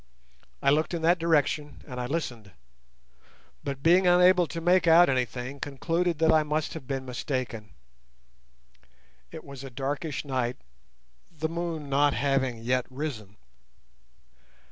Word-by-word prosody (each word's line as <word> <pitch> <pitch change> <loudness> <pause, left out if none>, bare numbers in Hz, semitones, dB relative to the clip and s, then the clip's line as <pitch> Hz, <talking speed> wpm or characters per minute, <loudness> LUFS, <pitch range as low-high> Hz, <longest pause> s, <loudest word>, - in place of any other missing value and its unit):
I 140 - +4
looked 155 +4 +1
in 165 - -4
that 170 +2 +4
direction 150 -2 0
and 125 -3 -6
I 125 - -3
listened, 120 - -4 1.1
but, 140 -1 -5
being 180 +3 +5
unable 180 0 +5
to 165 - -5
make 175 +1 +3
out 165 0 +7
anything, 125 +1 -2
concluded 165 +5 -1
that 160 +1 +3
I 160 -1 +5
must 150 0 -2
have 150 -6 -9
been 135 -1 -3
mistaken. 125 -4 -4 1.5
It 160 -1 -9
was 140 -2 -10
a 135 - -7
darkish 140 +4 -4
night, 125 -3 -2 0.7
the 160 -1 -3
moon 165 -3 -4
not 140 +1 +2
having 135 -3 0
yet 125 +1 0
risen. 130 -8 -6
145 Hz, 135 wpm, -27 LUFS, 130-165 Hz, 1.5 s, out